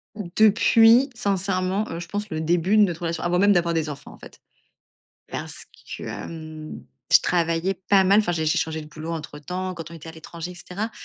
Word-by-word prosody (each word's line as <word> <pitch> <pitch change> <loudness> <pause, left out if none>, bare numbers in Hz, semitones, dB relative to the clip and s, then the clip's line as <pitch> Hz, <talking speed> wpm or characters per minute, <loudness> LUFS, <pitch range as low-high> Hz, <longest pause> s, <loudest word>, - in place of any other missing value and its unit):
Depuis, 225 +5 +5
sincèrement, 195 -4 -1
je 170 - -7
pense, 205 +2 -4
le 160 -1 -3
début 175 +5 +2
de 215 - +7
notre 175 -4 -1
relation, 165 -1 -3
avant 175 +1 +1
même 205 +1 +5
d'avoir 170 -1 +1
des 160 -2 -1
enfants, 140 - -9
en - - -15
fait. - - -15 0.9
Parce - - -6 0.3
que, - - -10
hem, 155 -1 -8 0.3
je - - +9
travaillais 170 +2 0
pas 195 -1 +6
mal, 195 +2 +5
enfin, 175 -5 +1
j'ai 160 -2 -1
j'ai 155 - +2
changé 160 0 -2
de 150 - -10
boulot 155 +2 -6
entre 155 -2 -6
temps 185 +4 -4
quand 165 -1 -8
on - - -8
était 165 0 -11
à 160 - -8
l'étranger, 165 +1 -8
et - - -13
cetera, 205 +6 -5
175 Hz, 205 wpm, -24 LUFS, 160-200 Hz, 0.9 s, je